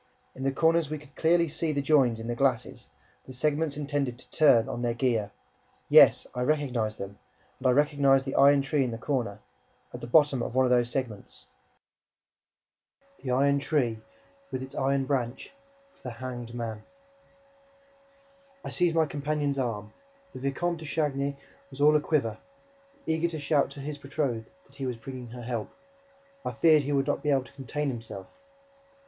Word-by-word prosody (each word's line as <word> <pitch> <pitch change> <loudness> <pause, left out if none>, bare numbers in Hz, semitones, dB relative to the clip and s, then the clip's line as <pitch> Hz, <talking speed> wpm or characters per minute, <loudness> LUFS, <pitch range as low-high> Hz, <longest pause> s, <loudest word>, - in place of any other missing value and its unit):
In 130 - -10
the 135 0 +1
corners, 165 +1 +2
we 155 - -3
could 145 -1 -17
clearly 170 +1 +3
see 160 +1 -1
the 145 - -1
"joins" 135 -6 +3
in 115 - -6
the 120 - -2
glasses, 125 -1 -1 0.4
the - - -8
segments 150 +3 0
intended 145 -4 -2
to - - -17
turn 130 -7 +5
on 120 -3 -4
their 120 -1 0
gear; 115 -4 0 0.6
yes, - - +7
I 125 - -3
recognized 125 -6 0
them 100 +1 -8 0.4
and 130 - 0
I - - +5
recognized 140 0 +3
the 135 - -3
iron 140 0 +5
tree 135 +1 +1
in 125 - -1
the 115 - -5
corner, 115 -6 -2 0.5
at - - -7
the - - -6
bottom 145 -1 +4
of - - -4
one 130 0 +4
of 125 - +1
those 120 -1 +3
segments... 120 -5 -5 1.8
the 130 - -5
iron 140 +3 +3
tree, 125 -7 0 0.5
with 130 - -4
its 135 +1 -9
iron 135 0 +1
branch, 130 -2 -2 0.4
for - - -30
the 125 - -6
hanged 120 -1 -7
men. 115 -2 -4 1.8
I - - -5
seized 175 -2 +1
my 160 -1 +4
companion's 145 -1 -2
arm: 110 -4 -3 0.4
the - - -8
Vicomte 160 +6 -1
de 160 - -8
Chagny 140 -3 -1 0.3
was 135 - -13
all 150 +1 +6
a 150 - +4
quiver, 115 -9 0 0.7
eager 160 +1 +1
to 160 -2 -5
shout 145 0 +2
to 140 - -11
his 145 +1 -6
betrothed 135 -5 -3 0.2
that 140 - -21
he 135 -2 -3
was 125 -2 -3
bringing 125 +1 -8
her 120 +1 -9
help. 115 -2 -3 0.7
I - - -3
feared 155 -2 +5
that - - -8
he - - -1
would 135 -1 +2
not 145 - -1
be 150 - -1
able 135 -2 +3
to - - -17
contain 140 +2 -3
himself. 115 -6 -7
135 Hz, 180 wpm, -28 LUFS, 120-145 Hz, 1.8 s, yes